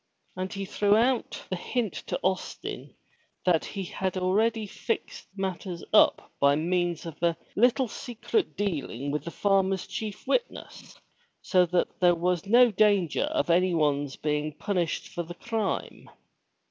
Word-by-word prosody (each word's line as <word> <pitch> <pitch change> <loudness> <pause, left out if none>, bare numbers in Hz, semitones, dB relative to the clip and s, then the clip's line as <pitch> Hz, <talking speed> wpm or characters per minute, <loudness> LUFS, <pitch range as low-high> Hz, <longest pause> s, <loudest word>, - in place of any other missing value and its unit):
And 185 0 -4
he 195 0 -4
threw 205 +2 +2
out 245 +2 0
the - - +1
hint 220 +2 -2
to - - -2
Austin 190 +1 -3 0.5
that 175 -3 +3
he 195 -2 -5
had 190 +1 -3
already 215 +4 +1
fixed 225 +3 -4
matters 185 -2 -4
up - - +4
by 140 0 +5
means 175 +1 0
of 165 -2 -8
a 170 -1 +2 0.2
little 250 +3 +3
secret 245 - -2
dealing 145 - -2
with 150 0 -2
the - - -3
farmer's 195 0 +1
chief 210 -2 -6
witness, - - -3 0.5
so 180 -2 +3
that 180 +1 -1
there 175 -1 +5
was 180 +2 -1
no 240 +2 +6
danger 205 - +3
of 300 - 0
anyone's 155 -6 +2
being 150 0 -2
punished 175 0 -2
for 175 - -4
the 175 +1 -8
crime. 220 +2 -3
185 Hz, 145 wpm, -27 LUFS, 170-210 Hz, 0.5 s, no